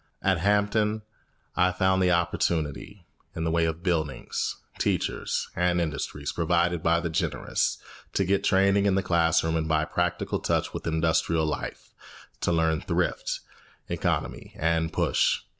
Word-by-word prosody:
At 95 -3 +2
Hampton 105 +3 +1 0.5
I 90 +1 +3
found 95 +1 +2
the 90 - +4
opportunity 85 +1 -1 0.3
in 80 - -2
the 80 - 0
way 85 0 +2
of 80 +1 -3
buildings, 80 -7 -1 0.2
teachers, - - -1
and 90 0 +2
industries 75 -2 -3
provided 85 0 +1
by 85 +1 +3
the 85 - -2
generous 80 - 0 0.4
to 95 - +1
get 95 +2 +1
training 100 +1 +3
in 95 - +3
the 95 - +1
classroom 80 -2 +2
and 80 -1 0
by 80 -1 +2
practical 90 0 -1
touch - - 0
with - - -5
industrial 80 0 +1
life, 75 - -5 0.5
to - - 0
learn 80 -1 +2
thrift, - - -1 0.5
economy, - - -2
and 80 0 +1
push. - - +2
85 Hz, 140 wpm, -27 LUFS, 80-95 Hz, 0.5 s, the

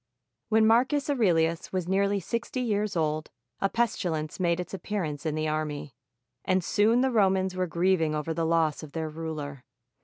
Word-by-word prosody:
When 220 0 +4
Marcus 260 +6 +3
Aurelius 170 -10 +1
was 185 -2 -2
nearly 200 +2 +2
sixty 235 +7 -3
years 210 -4 0
old, 155 -1 -1 0.3
a 195 - +1
pestilence 175 -10 -1
made 170 -1 +1
its 180 +1 -5
appearance 170 -7 -3
in 155 - -1
the 155 0 -1
army; 150 -3 -3 0.5
and 185 -1 +1
soon 220 +7 +3
the 265 0 +2
Romans 190 -4 +2
were 185 0 0
grieving 170 -2 +1
over 150 +2 -2
the 165 0 -1
loss 165 -2 +1
of 150 -2 -10
their 160 -1 -3
ruler. 150 -4 -6
175 Hz, 165 wpm, -27 LUFS, 155-205 Hz, 0.5 s, When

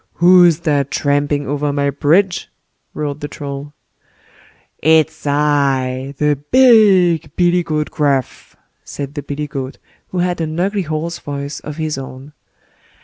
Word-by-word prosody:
"WHO'S 175 -2 +5
THAT 145 -5 0
tramping 145 +1 0
over 145 +1 -1
my 140 0 0
bridge?" 170 +7 +1 0.5
roared 145 -1 -4
the 145 - -5
Troll. 140 0 -7 1.1
"IT'S 160 -1 +2
I! 140 -2 0
THE 150 0 +1
BIG 195 - +4
BILLY 175 0 +2
GOAT 155 -2 -3
GRUFF", 140 -4 -2 0.3
said 140 -1 -7
the 145 - -5
billy 145 +1 -5
goat, 135 -2 -6 0.3
who 185 - -6
had 175 -1 -1
an 160 +1 -3
ugly 200 +2 0
hoarse 160 0 -4
voice 140 0 -6
of 150 0 -8
his 155 -3 -3
own. 135 +2 -10
150 Hz, 135 wpm, -17 LUFS, 140-170 Hz, 1.1 s, WHO'S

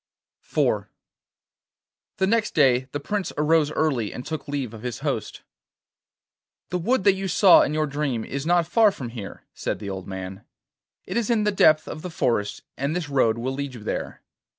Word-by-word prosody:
IV - - 0 1.3
The 190 - +2
next 220 +1 +1
day 130 -4 +4
the 145 - -3
Prince 200 +6 -3
arose 150 0 +3
early 130 -9 0
and 125 - -7
took 155 0 -5
leave 140 -5 -3
of 110 - -9
his 125 -1 -5
host. - - -3 1.3
'The 180 - 0
wood 235 +5 +1
that 200 - +6
you 195 0 -3
saw 190 0 +7
in 150 - 0
your 155 0 +1
dream 140 -6 -2
is 140 0 -4
not 175 +1 +3
far 215 +4 +4
from 130 -11 -7
here,' 115 -4 -8
said - - -3
the 100 -1 -6
old 95 -1 -6
man. 95 +1 -7 0.6
'It - - -3
is 235 -1 0
in 225 -3 +2
the 210 - +2
depth 155 -5 +4
of 155 - -6
the 180 - -5
forest, 115 -10 -1
and 140 +4 -2
this 170 -4 -3
road 115 -5 +2
will 130 +3 -2
lead 140 -1 -4
you 110 - -10
there. - - -4
145 Hz, 190 wpm, -24 LUFS, 125-180 Hz, 1.3 s, saw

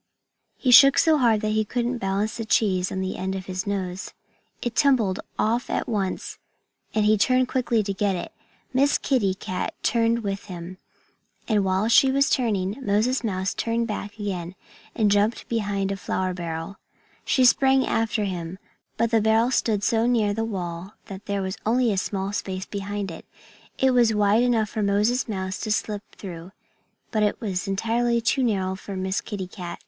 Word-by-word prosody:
He 255 - +1
shook 275 +3 +8
so 315 -2 +4
hard 230 -4 +3
that 215 -1 -1
he 215 0 +2
couldn't 245 +3 -2
balance 200 +3 -1
the 225 - -3
cheese 190 -4 +1
on 190 - -2
the 190 0 -3
end 190 +1 -3
of 190 -1 -5
his 185 +1 -4
nose. 190 -2 -3 0.5
It 240 -1 -3
tumbled 245 -10 +3 0.2
off 235 +3 0
at - - -1
once 200 -5 -3 0.6
and 215 -1 +2
he 215 0 +4
turned 255 +2 +3
quickly 240 -4 +1
to 200 0 -2
get 195 0 0
it. 175 - -5 0.4
Miss 275 +3 +3
Kitty 205 -9 +1
Cat 185 -1 -4
turned 230 0 +2
with 200 0 -3
him. 180 -1 -8 0.7
And 210 -4 +2
while 190 +2 +1
she 265 +3 +5
was 275 +1 +2
turning, 210 -3 0
Moses 220 +6 +1
Mouse 190 -3 -1
turned 230 0 -1
back 210 -2 -5
again 185 -4 -4 0.4
and 215 -3 +2
jumped 205 +3 +1
behind 200 -4 -1
a 195 - -3
flour 185 -1 -2
barrel. 170 +1 -5 0.5
She 260 - +3
sprang 265 +2 +4
after 225 -1 0
him. 180 -2 -4 0.4
But 230 0 +1
the 225 -2 +3
barrel 220 +3 +3
stood 215 -5 +1
so 225 +1 +2
near 220 -4 +2
the 225 +2 -2
wall 185 -2 -5
that 195 -2 -10
there 200 -1 -1
was 190 +1 -4
only 240 +1 +2
a - - -2
small 195 +1 -3
space 190 -2 -3
behind 200 -1 -4
it. 165 - -9 0.5
It 265 0 +3
was 240 -3 +3
wide 210 +2 +3
enough 230 -4 +2
for 215 - -2
Moses 210 +5 +1
Mouse 190 -2 -3
to 215 - -3
slip 210 -1 -1
through; 180 -1 -9 0.6
but 215 - 0
it 210 -1 +1
was 190 -6 -3
entirely 235 +4 +1
too 245 +4 +1
narrow 190 -5 0
for 195 +1 -8
Miss 190 +1 -1
Kitty 200 -4 -5
Cat. 180 -2 -8
210 Hz, 185 wpm, -24 LUFS, 190-230 Hz, 0.7 s, shook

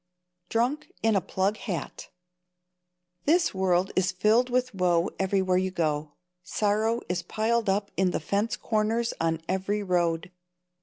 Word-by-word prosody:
Drunk 255 +7 0
in 225 -1 +3
a 195 - +3
Plug 195 +4 -1
Hat. 185 -6 -5 1.2
This 340 +4 +3
world 190 0 +1
is 185 +1 +2
filled 215 +7 +3
with 255 0 0
woe 180 -2 +2
everywhere 190 -1 +2
you 190 0 0
go. 155 -4 -1 0.3
Sorrow 215 +4 0
is 180 0 -1
piled 220 +4 0
up 200 +1 0
in 190 -1 +2
the - - -1
fence 200 +8 -1
corners 225 +1 0
on 165 0 0
every 195 +3 -1
road. 175 -2 0
195 Hz, 140 wpm, -27 LUFS, 180-220 Hz, 1.2 s, in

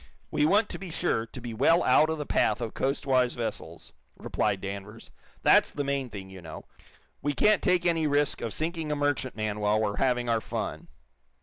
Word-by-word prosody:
"We 150 - +2
want 210 +5 +3
to - - -7
be 190 - -7
sure 155 -9 -1
to 125 - -10
be 120 -1 -6
well 165 +9 +3
out 150 +5 +4
of 160 - -1
the 150 - -4
path 105 - +1
of 115 -2 -4
coastwise 135 -2 +1
vessels," 85 -8 -6 0.2
replied 100 - -1
Danvers. 100 +3 -8 0.3
"That's - - +5
the 145 - -3
main 140 -2 -2
thing, 95 -3 -9
you 95 -1 -10
know. 80 -2 -9 0.6
We 145 +1 -1
can't 210 +8 +3
take 180 -2 +2
any 165 -3 +2
risk 145 -1 +2
of 115 - -3
sinking 160 +1 -2
a - - +1
merchantman 130 -7 -2
while 105 +1 +2
we're 105 -2 -1
having 125 -2 +1
our 115 -1 +1
fun." - - -5
130 Hz, 195 wpm, -28 LUFS, 110-150 Hz, 0.6 s, That's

